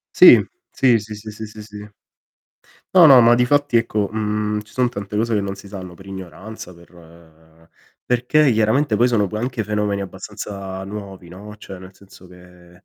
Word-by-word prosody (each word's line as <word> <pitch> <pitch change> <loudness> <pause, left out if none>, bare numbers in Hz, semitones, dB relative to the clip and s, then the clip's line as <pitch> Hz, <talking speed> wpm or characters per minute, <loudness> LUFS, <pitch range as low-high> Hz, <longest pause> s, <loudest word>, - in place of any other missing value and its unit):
Sì. - - +8 0.3
Sì, 120 -4 +3
sì, 105 +1 -9
sì, 105 +1 -9
sì, 110 +1 -8
sì, 105 0 -12
sì. 105 0 -12 1.0
No, 175 -3 +9
no, 135 -3 +8
ma 115 +1 +6
difatti 140 +3 +1
ecco, 110 -3 -1
mhmm, 105 0 -2
ci 105 - -19
son 125 -1 +1
tante 105 -4 -7
cose 115 +1 0
che 105 - +1
non 100 0 -4
si 100 0 -13
sanno 95 -3 -9
per 95 - -16
ignoranza, 95 +1 -10
per 80 -1 -20 0.3
perché 125 +4 +2
chiaramente 110 +3 +1
poi 120 +4 +3
sono 115 -4 +1
poi 105 +2 -5
anche 120 -1 -3
fenomeni 105 -1 -2
abbastanza 95 -1 -7
nuovi, 100 -3 -9
no, 100 +5 -11
cioè 95 -3 -10
nel 95 +1 -14
senso 95 -1 -17
che 90 0 -18
105 Hz, 180 wpm, -20 LUFS, 95-110 Hz, 1.0 s, No